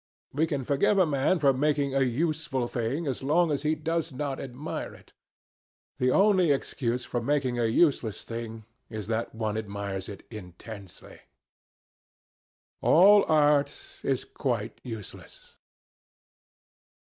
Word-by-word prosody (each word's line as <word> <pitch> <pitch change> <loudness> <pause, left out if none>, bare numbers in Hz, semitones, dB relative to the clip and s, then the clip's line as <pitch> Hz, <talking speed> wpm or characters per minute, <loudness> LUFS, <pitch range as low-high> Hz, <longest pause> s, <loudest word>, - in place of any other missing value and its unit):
We 155 +4 +1
can 140 -4 -2
forgive 140 - +2
a 185 - +5
man 145 +4 +1
for 140 -4 +4
making 140 0 +1
a 135 - +2
useful 140 0 0
thing 120 +8 -2
as 135 -4 -2
long 160 +4 +2
as 140 - -1
he 155 +1 +1
does 165 +1 -2
not 135 0 -3
admire 135 +4 -6
it. - - -20 0.9
The 125 - +3
only 190 +1 +4
excuse 125 -3 -1
for 120 - -2
making 130 -1 0
a 120 - +2
useless 120 - +2
thing 115 -1 -6 0.2
is 110 -3 -5
that 115 +1 -3
one 110 -1 -2
admires 100 -2 -5
it 100 - -9
intensely. 100 0 -10 1.6
All 200 +4 +6
art 145 -2 +3 0.2
is - - -1
quite - - -3
useless. 110 -5 -10
135 Hz, 130 wpm, -27 LUFS, 115-150 Hz, 1.6 s, All